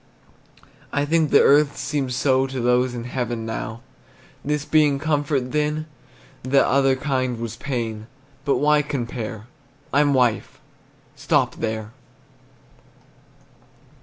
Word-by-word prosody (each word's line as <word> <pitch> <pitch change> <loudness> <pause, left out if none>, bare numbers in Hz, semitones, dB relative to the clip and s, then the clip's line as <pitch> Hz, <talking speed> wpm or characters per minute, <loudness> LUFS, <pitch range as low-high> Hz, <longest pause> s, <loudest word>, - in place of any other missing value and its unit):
I 145 0 0
think 160 0 +2
that - - +6
earth 145 0 +4
seems 135 -4 -2
so 130 0 +2
To 135 -1 -5
those 125 +1 +2
in 120 - -5
heaven 120 -2 -3
now. 110 0 -5 0.6
This 150 0 -2
being 150 -3 +3
comfort, 145 -3 -1
then 150 +1 -1 0.6
That 135 +2 +3
other 135 0 +3
kind 130 -3 -1
was 115 -2 -5
pain; 115 -5 -4 0.4
But 140 - +1
why 150 +1 +3
compare? 120 -6 -5 0.5
I'm 145 0 +3
wife! 125 -3 0 0.6
stop - - +1
there! 110 -1 -3
135 Hz, 115 wpm, -22 LUFS, 120-145 Hz, 0.6 s, that